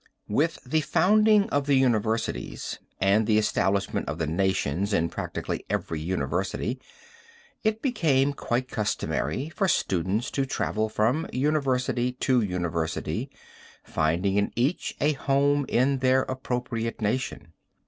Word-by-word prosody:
"With 150 +10 +1
the 155 +5 +1
founding 210 +5 +4
of 145 0 0
the 140 - +4
universities 110 - 0 0.2
and 100 +3 +3
the 110 - +4
establishment 100 -4 0
of 75 - -3
the 80 - -1
nations 95 +2 0
in 85 -3 +2
practically - - -4
every 80 - -2
university, 90 +4 -2 0.8
it 220 0 0
became 145 - +2
quite 125 -1 -2
customary 125 +5 -2
for 195 +4 0
students 95 - 0
to 135 -1 -1
travel 110 -4 -1
from 115 +9 +1
university 130 -3 0
to 125 -1 +2
university, 85 -5 -2 0.5
finding 90 +6 0
in 100 - +1
each 130 +9 0
a 150 - +3
home 140 0 +1
in 130 +2 +2
their 130 0 +3
appropriate 125 -3 -3
nation. 105 - -2
125 Hz, 125 wpm, -26 LUFS, 100-140 Hz, 0.8 s, founding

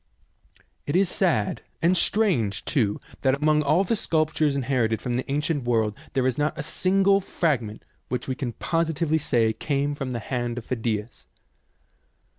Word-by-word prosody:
It 145 - -1
is 190 0 +4
sad, 170 - +1 0.2
and 170 +3 +3
strange 165 - +1
too, 110 -9 +1 0.2
that 135 -1 +3
among 150 0 +3
all 155 +6 +3
the 210 +4 0
sculptures 155 -6 +1
inherited 120 -5 0
from 125 +2 -3
the 130 +2 -2
ancient 145 0 0
world 110 -3 +1 0.2
there 130 -1 +1
is 130 +1 0
not 150 +1 0
a - - -3
single 195 +4 +2
fragment 125 - -1 0.2
which 125 0 -3
we 130 - 0
can 130 -3 -4
positively 160 0 0
say 115 -6 +2
came 145 +2 -1
from 135 -2 -4
the 125 - -3
hand 120 0 -3
of 120 - -6
Phidias. 110 - -3
140 Hz, 160 wpm, -25 LUFS, 120-160 Hz, 0.2 s, is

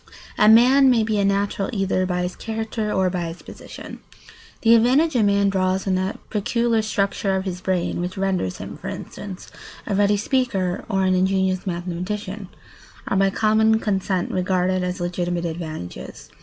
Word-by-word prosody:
A 210 - +5
man 255 +4 +6
may 235 -3 +3
be 215 -1 0
a - - +2
natural 200 0 0
either 195 -3 0
by 180 -1 -1
his 180 0 -4
character 220 -1 -3
or 190 -2 +1
by 175 -2 -2
his 165 +1 -8
position. - - -10 0.6
The 230 0 +5
advantages 255 +4 +4
a - - +3
man 200 0 +3
draws 190 0 0
from 190 - 0
that 185 +2 -1
peculiar 230 +2 +1
structure 200 -2 -1
of 190 0 -2
his 180 -1 -4
brain 180 -2 -1
which 180 +2 -4
renders 190 - -1
him, - - -8
for - - -8
instance, 195 -2 -8 0.3
a 205 - -2
ready 205 +1 +3
speaker 200 -6 -1
or 195 -2 +1
an 185 0 +2
ingenious 190 0 +1
mathematician, 185 +3 -4 0.6
are 195 - 0
by 195 0 +4
common 220 +2 +3
consent 190 -3 -1
regarded 185 0 0
as 180 0 -3
legitimate 175 0 -2
advantages. 160 - -7
195 Hz, 170 wpm, -22 LUFS, 185-215 Hz, 0.6 s, man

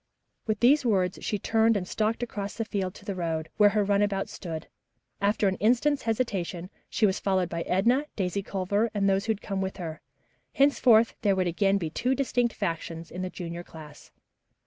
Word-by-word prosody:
With 215 -1 -1
these 275 +5 +5
words 190 -6 +1
she 210 - -1
turned 225 +2 +2
and 180 -2 -4
stalked 220 +4 -1
across 205 -4 -5
the 225 - -2
field 195 -4 -3
to 200 - -14
the 200 - -2
road, 165 -3 -3
where 210 -1 +7
her 210 0 +1
runabout 200 -1 +1
stood. 165 -4 -6 0.6
After 205 0 +2
an 190 - 0
instant's 255 +6 +2
hesitation, 195 -6 -2 0.2
she 220 - +2
was 190 -2 +1
followed 190 -3 0
by 170 0 -3
Edna, 240 +10 +2
Daisy 190 0 -1
Culver 200 +4 -1
and 200 -1 +2
those 195 +1 +2
who 220 - +3
had 210 - -12
come 195 -1 -2
with 190 0 -3
her. 165 -4 -6 0.5
Henceforth 245 -5 +4
there 200 -2 +3
would 185 -1 +1
again 195 +3 +2
be 165 -5 -3
two 255 +9 0
distinct 245 -3 0
factions 165 0 -4
in 180 - -5
the 185 - -3
junior 175 -1 -6
class. 150 -3 -13
200 Hz, 190 wpm, -27 LUFS, 180-225 Hz, 0.6 s, where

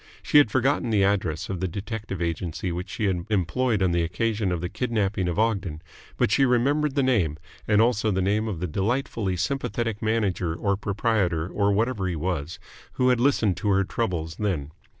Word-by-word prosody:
She 150 - +6
had 145 - +4
forgotten 130 +1 +1
the 105 -3 +3
address 90 -5 0
of 95 -2 -4
the 95 - -1
detective 100 0 -5
agency 85 +2 -3
which 90 +2 -5
she 110 - -2
had 90 -3 0
employed 105 +3 +1
on 90 - +2
the 85 0 +1
occasion 100 +4 -1
of 90 - -1
the 90 - -3
kidnapping 105 -5 -1
of 85 - -2
Ogden, 100 -8 0 0.4
but - - +2
she 135 - +4
remembered 135 +4 +2
the 140 - +2
name, 95 - +1 0.3
and 105 -1 +4
also 110 -1 +3
the 95 -2 0
name 105 +4 +1
of 100 -7 -3
the 90 - -2
delightfully 100 - -1
sympathetic 115 +1 -2
manager 100 -7 0
or 100 +3 0
proprietor 95 -5 0
or 100 +2 +1
whatever 105 -1 0
he 90 - -2
was 80 -1 -3 0.4
who 130 0 +2
had 125 -2 +3
listened 115 -8 +2
to 105 - -1
her 100 0 +3
troubles 85 -6 -3
then. 85 -9 -2
100 Hz, 190 wpm, -25 LUFS, 90-115 Hz, 0.4 s, She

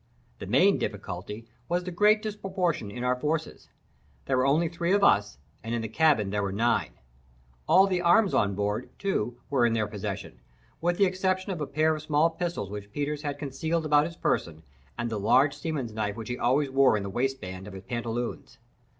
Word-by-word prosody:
The - - -7
main - - +4
difficulty 100 +5 -5 0.2
was 175 +1 0
the 180 - -5
great 210 +4 +4
disproportion 190 - -2
in 120 +4 -6
our 125 0 +2
forces. 150 +4 -3 0.6
There 135 - +1
were 130 +1 +2
only 160 +5 +3
three 170 +2 -1
of 200 0 +3
us, 105 - +3 0.3
and 115 +1 -2
in 115 - -2
the - - -2
cabin 110 -5 +2
there 105 0 0
were 100 -1 -2
nine. 105 - +1 0.7
All 190 +1 +6
the 185 -2 0
arms 180 +4 +4
on 100 -1 +2
board, 105 +4 -2
too, 120 - -1
were 135 -4 +3
in 120 -1 +3
their 110 -1 +1
possession, 100 - -6 0.4
with 175 +1 +1
the 200 - +5
exception 185 +1 -1
of 175 -5 -4
a 145 - -2
pair 155 +2 +2
of 155 - -6
small 155 +1 +2
pistols 170 - -4
which 105 0 -7
Peters 145 +3 -3
had 145 -2 -3
concealed 160 +3 -2
about 150 0 +4
his 170 0 -10
person, 80 -1 -1 0.3
and 120 - -2
the 110 - -2
large 130 +7 +4
seaman's 145 -7 -4
knife 105 -2 -2
which 115 0 -7
he 125 - -3
always 135 +3 +2
wore 135 -4 +4
in 100 - -3
the - - -4
waistband 105 -6 -3
of 105 - -9
his 95 - -9
pantaloons. 120 +1 -4
135 Hz, 200 wpm, -27 LUFS, 105-170 Hz, 0.7 s, All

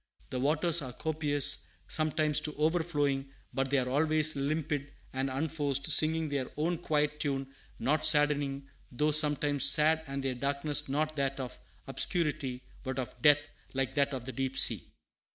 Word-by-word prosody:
The 130 - -3
waters 155 +5 +2
are 130 -3 -7
copious, 145 -1 +1 0.2
sometimes 155 -1 +1
to 150 0 -4
overflowing; 150 -4 -1 0.2
but 135 0 -2
they 140 - +1
are 125 -1 -1
always 155 +3 +3
limpid 145 0 -3 0.2
and 135 +1 -2
unforced, 140 0 -1
singing 160 +1 +2
their 140 -3 -3
own 165 +2 -1
quiet 150 -2 -1
tune, 135 -2 -3 0.2
not 145 +6 0
saddening, 145 -2 +3 0.2
though 150 +5 0
sometimes 145 -2 +2
sad, 155 +1 +5
and 140 0 -5
their 135 -1 -2
darkness 140 +3 -1
not 155 +3 -1
that 135 0 -2
of 130 -2 -6 0.3
obscurity, 140 -7 -2 0.2
but 130 0 -5
of 130 -2 -6
depth, 145 -1 +4 0.3
like 135 0 -1
that 140 0 +1
of 130 -3 -6
the 130 - -5
deep 135 0 -3
sea. - - +5
145 Hz, 155 wpm, -30 LUFS, 135-155 Hz, 0.3 s, sad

